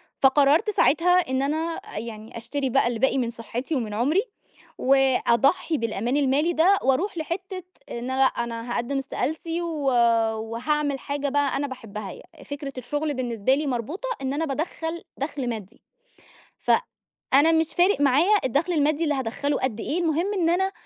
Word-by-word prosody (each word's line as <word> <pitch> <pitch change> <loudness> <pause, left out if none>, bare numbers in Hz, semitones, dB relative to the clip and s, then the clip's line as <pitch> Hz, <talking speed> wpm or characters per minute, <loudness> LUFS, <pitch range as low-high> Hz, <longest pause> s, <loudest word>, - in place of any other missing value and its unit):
فقرّرت 285 +7 +4
ساعتها 355 -2 +3 0.2
إن 260 - +1
أنا 285 +3 0 0.2
آآ - - -9
يعني 220 0 -8
أشتري 265 +4 -3
بقى 250 -1 +3
اللي 235 -2 -2
باقي 265 0 +2
من 240 -3 0
صحّتي 240 +5 -4
ومن 225 -6 -2
عُمري، 285 - +2 0.6
وأضحّي 270 +4 +3
بالأمان 230 +3 -1
المالي 290 +5 +2
ده 370 +6 +4
وأرُوح 330 +9 +1
لحتّة 370 +3 -4 0.3
إن - - -4 0.2
أنا 260 - -2
لأ - - +7
أنا 235 -1 -2
هاقدّم 245 +4 -1
استقالتي 315 +5 -3
و 320 -4 -3 0.5
وهاعمل 275 +5 -1
حاجة 285 0 -3
بقى 285 0 +1
أنا 285 +1 -1
باحبّها، 215 -6 -7
يعني - - -14
فكرة 285 -1 -6
الشغل 290 +5 -2
بالنسبة 245 -2 0
لي 295 0 -2
مربوطة 290 - -3
إن 265 +1 -2
أنا 320 +3 -1
بادخّل 325 +3 -4
دخْل 275 -3 -3
مادّي، 220 +1 -7 0.8
ف - - 0 0.6
أنا 295 +4 +6
مش 320 0 +3
فارِق 360 -3 +3
معايا 290 +10 +4
الدخل 300 +8 +1
المادّي 305 +1 +2
اللي 295 -3 +1
هادخّله 270 +3 -1
قد 245 -4 -2
إيه، 330 +5 -2
المهم 340 +5 0
إن 340 -4 +1
أنا 380 +2 +1
280 Hz, 165 wpm, -24 LUFS, 245-320 Hz, 0.8 s, لأ